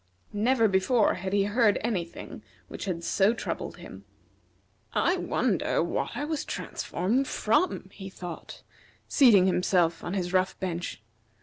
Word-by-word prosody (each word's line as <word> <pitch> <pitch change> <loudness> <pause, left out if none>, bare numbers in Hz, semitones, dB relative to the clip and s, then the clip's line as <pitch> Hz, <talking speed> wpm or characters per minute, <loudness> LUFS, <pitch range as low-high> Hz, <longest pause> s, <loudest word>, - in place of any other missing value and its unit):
Never 230 +2 +3
before 200 +4 +3
had 190 +1 -5
he 200 0 +3
heard 210 +1 +3
any 210 -7 0
thing 170 - -10 0.3
which - - -6
had 175 -3 -3
so 205 +6 +2
troubled - - -5
him. - - -11 0.9
"I - - +2
wonder - - 0
what - - -3
I 290 - -2
was 310 -1 -2
transformed 235 +10 -2
from?" 220 - 0
he 195 -1 -8
thought, 180 -2 -9 0.4
seating 225 - +6
himself 180 -2 +2
on 175 - -3
his 180 -1 -2
rough 185 0 +1
bench. 175 - -4
195 Hz, 140 wpm, -27 LUFS, 180-230 Hz, 0.9 s, seating